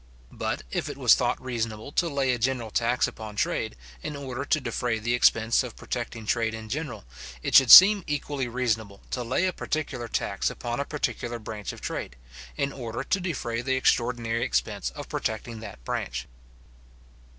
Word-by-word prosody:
But, - - -3
if - - -2
it - - -6
was - - +6
thought - - +1
reasonable 115 -1 -4
to 170 +3 +1
lay 135 -3 +1
a 120 - -2
general 120 -2 -1
tax 120 +3 +2
upon 110 -2 -8
trade, 80 - -1 0.3
in 150 - -5
order 135 -2 -5
to 155 - +2
defray 125 -4 -1
the 115 +2 -1
expense 115 -1 +4
of 125 -4 -6
protecting 115 -2 -5
trade 115 0 0
in 110 -1 -8
general, 130 - -4 0.4
it - - -2
should 135 -3 +8
seem 200 - +11
equally 145 -3 -2
reasonable 110 -5 -2
to 125 - -2
lay 130 +9 +1
a 185 - 0
particular 140 -8 -3
tax - - -1
upon 120 +1 -4
a 140 - -1
particular 120 -5 -3
branch 110 -2 -6
of - - -11
trade, - - -4 0.4
in 140 -2 -1
order 120 -3 -5
to 185 +1 0
defray 130 -10 -3
the 130 +1 0
extraordinary 120 -2 +1
expense 65 - -1
of - - -7
protecting 110 +1 -3
that 60 - -10
branch. 65 +1 -3
120 Hz, 175 wpm, -26 LUFS, 115-135 Hz, 0.4 s, seem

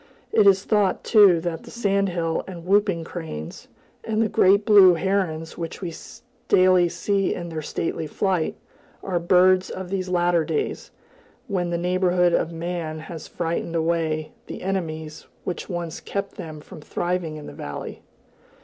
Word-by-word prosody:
It 210 -2 +5
is 195 0 +5
thought, 205 -3 +1
too, 200 -6 +6
that 165 -1 -3
the - - -13
sand 200 -4 0
hill 165 -2 -1
and 175 -3 -8
whooping 195 -3 +2
cranes, 160 - -7 0.4
and 220 -1 -1
the 225 - +3
great 200 +2 +4
blue 195 -4 +7
herons 170 -3 -1
which 165 -1 -5
we 170 -2 -4 0.5
daily 185 -1 +5
see 195 +2 0
in 175 -1 -6
their 160 -1 -4
stately 160 +1 -3
flight, 180 +1 0 0.5
are 180 -3 -1
birds 185 +1 +4
of 185 -1 -6
these 185 -2 -2
later 175 -2 +2
days, 430 - -3 0.6
when 180 -5 -1
the 170 - -1
neighborhood 180 0 +2
of 165 - +1
man 165 -1 -4
has 160 +1 -8
frightened 170 0 -3
away 160 -1 0 0.2
the - - -7
enemies 160 -5 -4 0.2
which 175 - -5
once 175 -3 -4
kept 200 0 -4
them 155 -4 -8
from 155 - -12
thriving 175 0 -2
in 150 -1 -8
the - - -9
valley. 75 - -7
175 Hz, 160 wpm, -24 LUFS, 165-190 Hz, 0.6 s, blue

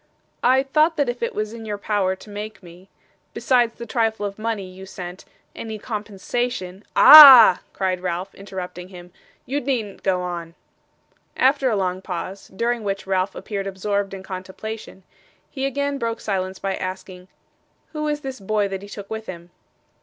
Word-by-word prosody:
'I 260 +2 +4
thought 310 +4 +2
that 285 -4 +1
if 245 0 -4
it 235 - -2
was 215 +1 -3
in 230 -1 -9
your 210 -2 -4
power 200 -2 0
to 190 +3 -15
make 210 -1 -7
me, 180 +2 -15 0.5
besides 240 -3 +2
the 235 - -8
trifle 225 -2 -1
of 200 +1 -6
money 220 -3 -3
you 185 +1 -12
sent, 180 -1 -9 0.3
any 220 -1 -6
compensation 210 -2 -4
' - - -43
'Ah!' 265 -11 +11
cried 185 -2 -1
Ralph, 180 +1 -4
interrupting 185 -2 -8
him. 180 -1 -13 0.3
'You 285 +3 -2
needn't 235 -7 -3
go 185 -2 0
on.' 170 -2 -6 0.8
After 265 0 +3
a 220 - 0
long 185 -1 -2
pause, 190 +1 -6
during 235 +4 -2
which 195 -1 -3
Ralph 190 0 -1
appeared 200 -2 -5
absorbed 195 +1 -2
in 190 - -9
contemplation, 190 +2 -8 0.5
he 270 -1 -2
again 280 +1 -2
broke 230 -1 -3
silence 190 -2 -3
by 195 -1 -3
asking: 185 0 -7 0.7
'Who 305 -1 -3
is 295 0 -2
this 265 -3 -6
boy 205 +1 0
that 195 -1 -5
he 200 - -11
took 205 -1 -9
with 220 0 -5
him? 175 -1 -9
200 Hz, 170 wpm, -22 LUFS, 185-235 Hz, 0.8 s, Ah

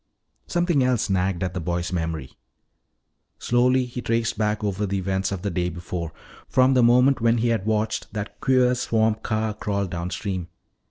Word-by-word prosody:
Something 175 -5 +2
else 125 -5 +1
nagged 95 -1 0
at 90 -1 -2
the 90 - -3
boy's 85 +1 -2
memory. 80 -6 -3 1.1
Slowly 125 +1 +2
he 125 0 -6
traced 115 -1 0
back 105 0 -1
over 100 0 -1
the 100 +1 -1
events 95 0 -1
of 95 -3 -4
the 100 - -1
day 90 0 -1
before, 85 -1 -5 0.4
from 130 +1 +4
the 130 - +4
moment 125 +2 +4
when 115 +1 +3
he 120 +1 +1
had 110 -3 0
watched 110 0 -1
that 105 -1 -5
queer 130 -1 +4
swamp 110 -3 +1
car 110 0 -1
crawl 100 -1 -2
downstream. 90 +1 -4
105 Hz, 170 wpm, -24 LUFS, 90-120 Hz, 1.1 s, from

